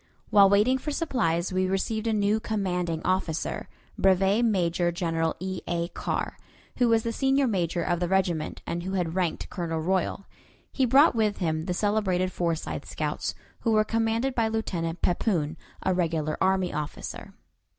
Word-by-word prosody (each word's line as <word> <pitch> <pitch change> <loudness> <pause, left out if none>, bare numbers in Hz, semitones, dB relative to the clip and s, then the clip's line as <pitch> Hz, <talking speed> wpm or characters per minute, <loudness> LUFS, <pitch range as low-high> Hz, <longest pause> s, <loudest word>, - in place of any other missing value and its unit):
While 200 -1 +7
waiting 215 +7 +4
for 300 - -4
supplies 195 - 0
we 185 0 +1
received 215 +4 -1
a - - +2
new 210 0 +2
commanding 180 -7 -2
officer, 185 -3 -1 0.3
Brevet 195 +4 +3
Major 175 -5 +1
General 165 -2 -1
E. 185 0 -4
A. 170 0 -1
Carr, - - -3 0.4
who 245 -1 +3
was 225 -1 +3
the 230 - -1
senior 270 +2 +2
major 175 -6 0
of 175 0 0
the 175 - 0
regiment, 175 -4 0
and 170 - -3
who 190 +2 -2
ranked 170 0 -2
Colonel 165 -3 -2
Royal. 185 +3 -1 0.5
He 265 -2 +1
brought 275 +6 +6
with 215 -3 +1
him 160 -3 -1
the 180 -1 -2
celebrated 190 -3 +1
Forsyth 170 -3 -2
scouts, - - -3 0.2
who 230 - +1
were 215 0 +5
commanded 225 +4 0
by 230 -3 +1
Lieutenant 175 -7 -3
Pepoon, 170 -4 +1 0.3
a 190 - +2
regular 160 -4 0
army 190 -1 +2
officer. 150 0 -6
190 Hz, 160 wpm, -27 LUFS, 170-220 Hz, 0.5 s, While